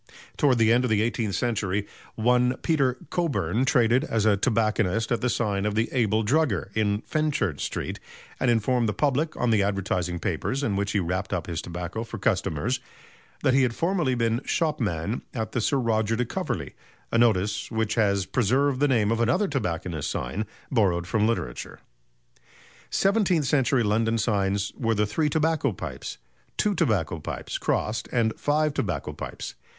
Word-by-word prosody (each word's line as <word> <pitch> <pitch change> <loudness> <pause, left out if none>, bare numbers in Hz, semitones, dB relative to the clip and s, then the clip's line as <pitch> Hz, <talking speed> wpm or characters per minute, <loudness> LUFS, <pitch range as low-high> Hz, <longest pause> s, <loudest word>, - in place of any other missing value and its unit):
Towards 135 -4 +3
the 115 -1 +4
end 125 +2 +3
of 125 - 0
the 110 -1 +3
eighteenth 115 -4 -1
century 100 -3 -1 0.3
one 125 +2 +2
Peter 135 -6 +2
Cockburn 120 - 0
traded 120 +1 +3
as 115 -8 0
a 105 -2 +5
tobacconist 110 0 +1
at 120 - +1
the 125 - +1
sign 105 -4 0
of 105 0 -1
the 110 +1 +1
"Abel 110 -3 +2
Drugger" 110 - +1
in 105 -1 +1
Fenchurch 145 - -1
Street, - - -4 0.4
and 130 - +2
informed 120 0 +2
the - - -1
public 150 +4 0
on 120 - +1
the 110 -2 +4
advertising 95 -3 -1
papers 135 - -2
in 105 -8 0
which 100 +2 -1
he 105 - +2
wrapped 95 +2 -2
up 90 -4 -1
his 85 -2 -3
tobacco 90 +5 -5
for 115 - -7
customers - - 0 0.6
that 130 - +3
he 135 - +5
had 120 -3 +1
formerly 170 -7 +1
been 115 0 +1
shopman 110 - -1
at 110 -2 -3
the 125 - -1
Sir 140 - +1
Roger 115 -3 +1
de 125 +2 0
Coverley - - -3 0.4
a 115 - +2
notice 105 -3 +2
which 110 -1 -1
has 100 -4 +2
preserved 130 +5 +1
the 145 - +4
name 115 -6 +2
of 115 - 0
another 125 - +2
tobacconist's 85 - -2
sign 100 - -3 0.2
borrowed 95 -9 +2
from 110 +3 +1
literature. 90 - -3 1.1
Seventeenth 195 -6 +2
century 130 -2 +2
London 115 +2 +1
signs 100 -2 0
were 115 -2 0
the 105 +1 +2
"Three 150 +9 0
Tobacco 160 -3 +1
Pipes," 95 - -6 0.4
"Two 210 -1 +2
Tobacco 85 - 0
Pipes" - - -5
crossed, 110 +1 -1
and 115 -2 +2
"Five 150 0 +1
Tobacco - - -2
Pipes." - - -6
115 Hz, 170 wpm, -26 LUFS, 100-130 Hz, 1.1 s, a